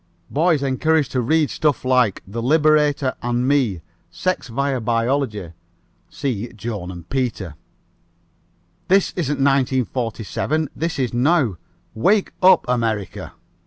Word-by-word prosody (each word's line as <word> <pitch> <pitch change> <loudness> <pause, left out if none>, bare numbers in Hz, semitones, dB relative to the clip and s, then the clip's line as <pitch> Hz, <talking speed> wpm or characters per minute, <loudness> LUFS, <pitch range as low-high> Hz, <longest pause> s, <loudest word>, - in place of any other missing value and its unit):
Boys 155 -1 +2
encouraged 145 +3 +1
to 130 - 0
read 155 +5 +1
stuff 145 -5 0
like 125 -6 +2
The 110 +5 -5
Liberator 150 0 +3
and 120 +1 -1
me. 125 - +1 0.3
Sex 185 -5 -2
via 135 +2 -1
biology 115 - -1 0.6
(see 125 -6 -3
Joan 105 -4 -5
and 85 -2 -9
Peter). 120 - -2 1.3
This 195 +1 +3
isn't 150 -5 -1
1947. 130 +1 0
This 165 +1 -2
is 130 -3 -1
now. 125 - +2 0.4
Wake 195 - +2
up 185 -1 +6
America!" 115 -5 -2
130 Hz, 115 wpm, -21 LUFS, 115-150 Hz, 1.3 s, up